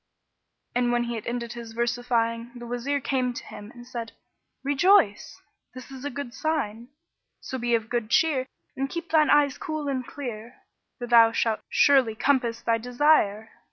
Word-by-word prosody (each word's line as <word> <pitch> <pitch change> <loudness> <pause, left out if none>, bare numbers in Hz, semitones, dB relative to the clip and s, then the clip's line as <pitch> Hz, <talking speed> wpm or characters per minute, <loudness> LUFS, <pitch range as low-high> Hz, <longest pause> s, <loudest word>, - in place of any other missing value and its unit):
And 245 0 +1
when 240 0 +1
he 240 0 -4
had 225 - -6
ended 235 -1 -3
his 235 -2 -9
versifying, 235 0 -1
the 240 0 -8
Wazir 245 +4 -2
came 255 -2 -1
to - - -6
him 205 0 -10
and 240 +1 -13
said, 235 -2 -6 0.5
"Rejoice; 285 - +3 0.4
this 255 +1 -10
is 265 -1 -9
a 290 - -2
good 275 -2 -6
sign: 240 -8 -2 0.5
so 260 - -6
be 240 0 +1
of 225 -1 -2
good 235 -2 -2
cheer 275 -2 +2 0.3
and 270 +1 -2
keep 340 +2 -6
thine 310 -2 +4
eyes 290 -2 +3
cool 310 -2 -4
and 265 -2 -1
clear, 240 -3 -7 0.4
for 245 - -5
thou 230 -1 +6
shalt 225 -2 0
surely 265 -6 +4
compass 240 -2 +1
thy 230 0 +1
desire." 240 -4 +2
245 Hz, 170 wpm, -26 LUFS, 230-275 Hz, 0.5 s, thou